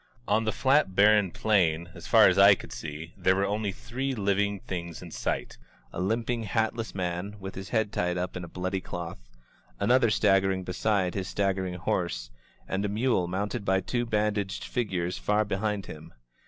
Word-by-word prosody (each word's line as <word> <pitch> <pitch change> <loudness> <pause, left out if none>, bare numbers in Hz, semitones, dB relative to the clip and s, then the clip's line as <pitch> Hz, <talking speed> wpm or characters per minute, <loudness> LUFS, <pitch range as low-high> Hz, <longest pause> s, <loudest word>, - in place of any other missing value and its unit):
On 110 +2 +2
the 110 - +1
flat 135 -7 +2
barren 105 -1 +5
plain, 85 -5 +1
as 85 -2 -10
far 110 -2 +7
as 95 +1 +3
I 100 0 +9
could - - -10
see, 80 +1 -7
there 95 - +2
were 100 +1 +1
only 105 0 -1
three 130 +6 -4
Uving 100 -1 0
things 85 -2 -5
in - - -10
sight: - - -3 0.3
a - - -3
limping, 115 +4 0
hatless 110 +1 -1
man, 90 +2 -3
with 95 -1 -7
his 95 +1 -7
head 110 -3 0
tied 90 0 0
up 90 0 -3
in 90 - -5
a - - -7
bloody 95 +2 -3
cloth; 85 -4 -6 0.6
another 125 -1 +4
staggering 95 -2 +2
beside 90 0 0
his 95 -2 -3
staggering 95 -2 -1
horse; - - -2 0.4
and 95 +1 -1
a 105 - 0
mule 110 -3 +1
mounted 100 +5 -2
by 95 -1 +2
two 120 +5 -2
bandaged 105 -3 -1
figures 90 -7 -2
far 105 +1 +1
be 100 -2 -2
hind 105 -1 -1
them. 80 -2 -11
100 Hz, 180 wpm, -28 LUFS, 90-110 Hz, 0.6 s, I